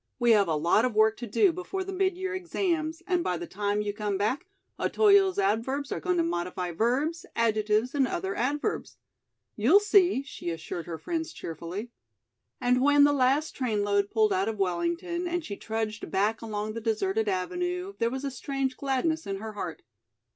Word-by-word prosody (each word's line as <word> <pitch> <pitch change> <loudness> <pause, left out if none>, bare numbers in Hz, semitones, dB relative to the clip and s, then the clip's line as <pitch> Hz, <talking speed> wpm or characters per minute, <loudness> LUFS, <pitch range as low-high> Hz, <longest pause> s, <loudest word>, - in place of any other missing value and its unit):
"We 240 -2 +3
have 205 -4 +5
a 160 - +1
lot 170 +8 +3
of 250 -3 0
work 220 +1 +4
to 240 - -6
do 380 - +4
before 365 +2 -4
the 390 +1 -6
mid 375 -1 +1
year 375 +1 -3
exams. 340 -3 -2
and 360 -2 +1
by 180 - -1
the 175 - -5
time 205 +3 -1
you 205 -1 -2
come 205 -2 -2
back, 255 - -1 0.3
Otoyo's 400 -3 +4
adverbs 230 +8 0
are - - -2
going 180 +3 0
to 170 - +3
modify 175 +1 -2
verbs, 265 - 0
adjectives 220 +1 +1
and 275 -3 +2
other 190 -2 -2
adverbs. 290 - -2 0.6
You'll 260 - +5
see," 395 -8 +4
she 270 - -6
assured 165 +1 -5
her 165 -2 -4
friends 325 - -3
cheerfully. 170 +8 -6 0.7
And 250 +1 +2
when 290 +1 +6
the 290 0 +5
last 275 +3 +2
train 220 -6 0
load 200 0 +1
pulled 215 -3 +2
out 190 +3 +1
of 220 - -4
Wellington, 340 - -1
and 350 -1 -2
she 200 - -5
trudged 220 0 -4
back 210 +3 +1
along 215 -1 -4
the 230 - -5
deserted 215 -1 0
avenue, 355 - -2
there 230 - +2
was 265 +2 -5
a 275 - -2
strange 265 0 -3
gladness 275 0 -1
in 195 - -2
her 215 +2 -6
heart. 195 -5 -6
230 Hz, 190 wpm, -28 LUFS, 205-320 Hz, 0.7 s, when